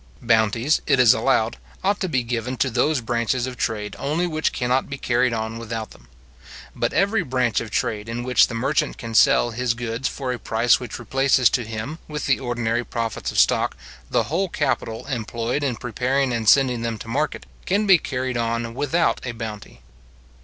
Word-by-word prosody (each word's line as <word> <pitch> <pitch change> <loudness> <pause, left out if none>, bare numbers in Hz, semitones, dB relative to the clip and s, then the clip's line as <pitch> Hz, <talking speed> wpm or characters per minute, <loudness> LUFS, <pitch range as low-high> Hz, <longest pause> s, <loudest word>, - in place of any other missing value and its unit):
Bounties, 115 +5 +2
it 135 - +3
is 125 -1 +7
allowed, 120 -4 +1 0.3
ought 200 +2 +1
to 185 - -2
be 130 -5 +1
given 120 +2 -3
to 130 - +1
those 130 +4 +1
branches 120 +2 0
of 130 -1 -6
trade 105 -3 -3
only 155 +5 0
which 155 -2 0
cannot 125 +1 0
be 140 - -5
carried 125 -1 +1
on 110 0 -3
without 115 -1 -5
them. - - -17 0.7
But - - 0
every 200 +5 +2
branch 125 -4 0
of 115 - -6
trade 105 +2 -2
in 120 +1 -3
which 125 0 +4
the 115 - -6
merchant 135 +5 0
can 115 -1 -7
sell 120 +1 +5
his 120 0 -1
goods 120 +2 -3
for 130 -2 -3
a 120 - -6
price 115 +2 +2
which 125 -4 -6
replaces 130 0 +2
to 125 - 0
him, 110 +9 -5
with 150 -1 -4
the 135 - +2
ordinary 120 -2 -1
profits 115 -2 -3
of - - -6
stock, - - +3 0.3
the - - +2
whole 180 +5 -1
capital 115 -8 -2
employed 120 +1 -2
in 130 -4 0
preparing 125 +3 -1
and 115 -2 +2
sending 130 -4 +4
them 115 -1 -2
to 115 - -10
market, 145 +6 -2 0.2
can 205 +3 +2
be 190 -4 +6
carried 130 -3 -3
on 115 0 -2
without 145 +6 +1
a 125 - -4
bounty. 110 - -8
120 Hz, 190 wpm, -23 LUFS, 115-135 Hz, 0.7 s, is